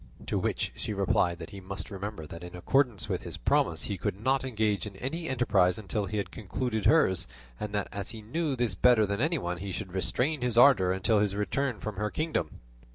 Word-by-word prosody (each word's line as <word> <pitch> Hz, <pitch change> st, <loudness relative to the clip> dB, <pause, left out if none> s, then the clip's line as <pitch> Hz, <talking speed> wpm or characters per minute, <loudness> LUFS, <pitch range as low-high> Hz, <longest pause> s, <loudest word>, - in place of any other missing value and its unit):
To -, -, 0 dB
which -, -, -1 dB
she 105 Hz, -, -3 dB
replied 90 Hz, -3 st, +2 dB
that 80 Hz, +2 st, -9 dB
he 100 Hz, -2 st, -8 dB
must 95 Hz, +3 st, -6 dB
remember 100 Hz, -4 st, -5 dB
that 85 Hz, +3 st, -9 dB
in 90 Hz, 0 st, -8 dB
accordance 110 Hz, -, +1 dB
with -, -, -2 dB
his -, -, -6 dB
promise 80 Hz, -1 st, +2 dB
he 100 Hz, -3 st, -3 dB
could 95 Hz, -, -2 dB
not 130 Hz, +4 st, +1 dB
engage 110 Hz, -5 st, 0 dB
in 100 Hz, -, -9 dB
any 160 Hz, -, -4 dB
enterprise 105 Hz, -8 st, +3 dB
until 105 Hz, -1 st, -2 dB
he 105 Hz, -, -3 dB
had 100 Hz, -, -2 dB
concluded 110 Hz, +2 st, -2 dB
hers; 95 Hz, -, +3 dB, 0.3 s
and 105 Hz, -, -4 dB
that 105 Hz, -, 0 dB
as 100 Hz, -1 st, -4 dB
he 110 Hz, -1 st, -5 dB
knew 150 Hz, +5 st, -1 dB
this 120 Hz, -5 st, +1 dB
better 110 Hz, +3 st, +5 dB
than 100 Hz, +2 st, -2 dB
anyone, 135 Hz, -, 0 dB
he 95 Hz, +3 st, -5 dB
should 90 Hz, 0 st, -5 dB
restrain 125 Hz, +9 st, 0 dB
his 125 Hz, -2 st, 0 dB
ardour 120 Hz, -8 st, +7 dB
until 95 Hz, +3 st, +2 dB
his 100 Hz, -1 st, +1 dB
return 125 Hz, +4 st, -1 dB
from 105 Hz, -3 st, -5 dB
her 105 Hz, +1 st, -1 dB
kingdom. 155 Hz, +7 st, -2 dB
105 Hz, 215 wpm, -29 LUFS, 95-125 Hz, 0.3 s, ardour